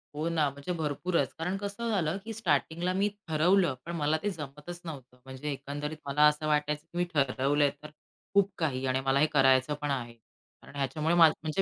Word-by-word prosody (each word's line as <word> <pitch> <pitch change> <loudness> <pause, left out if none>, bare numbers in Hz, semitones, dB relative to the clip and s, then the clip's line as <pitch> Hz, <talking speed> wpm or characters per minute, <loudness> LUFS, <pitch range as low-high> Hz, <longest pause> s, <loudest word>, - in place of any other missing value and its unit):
हो 155 +2 -2
ना 155 -4 +2
म्हणजे 140 +5 -6
भरपूरच. 150 -1 -1
कारण 180 +4 -2
कसं 205 +4 -4
झालं, 185 -4 0
की 225 - -5
स्टार्टिंगला 175 -2 0
मी 200 +2 +2 0.2
ठरवलं 165 0 +3
पण 170 - -5
मला 155 0 +1
ते 205 - +1
जमतच 150 +1 -7
नव्हतं. 130 -5 -9
म्हणजे 130 +3 -5
एकंदरीत 145 +2 -5
मला 150 +2 +4
असं 150 +1 0
वाटायचं, 150 0 +1
की 170 - -10
मी 175 - +2
ठरवलंय 140 +1 +2
तर 150 - -8 0.4
खूप 200 0 +4
काही 135 -5 -1
आणि 130 +1 +1
मला 135 +1 +3
हे 150 - +5
करायचं 135 +1 +4
पण 145 -1 -1
आहे. 120 -3 -3 0.5
कारण - - -15
ह्याच्यामुळे 150 +4 0
म्हणजे 160 +1 +4
150 Hz, 185 wpm, -29 LUFS, 140-175 Hz, 0.5 s, हे